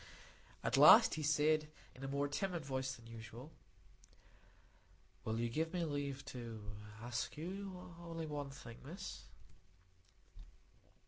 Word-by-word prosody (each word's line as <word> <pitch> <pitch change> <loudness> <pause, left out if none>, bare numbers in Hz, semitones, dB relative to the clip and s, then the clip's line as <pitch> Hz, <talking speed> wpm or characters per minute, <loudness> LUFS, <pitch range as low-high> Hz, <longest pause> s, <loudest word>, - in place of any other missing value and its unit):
At - - +2
last - - +10
he 155 - -2
said, 155 +1 +3 0.3
in 130 - -11
a - - -2
more 140 +1 0
timid 175 +2 -2
voice 130 -1 -1
than 115 -2 -15
usual,— 115 +5 -9 1.7
"Will 110 +1 -1
you 120 - +1
give 160 +8 -1
me 175 - +1
leave 140 -3 -2
to 115 -4 -6 0.4
ask 120 +4 -2
you 185 +2 -6
only 165 -1 -5
one 145 -2 -3
thing, 120 -4 -10
Miss?" 180 +7 -7
145 Hz, 125 wpm, -38 LUFS, 125-160 Hz, 1.7 s, last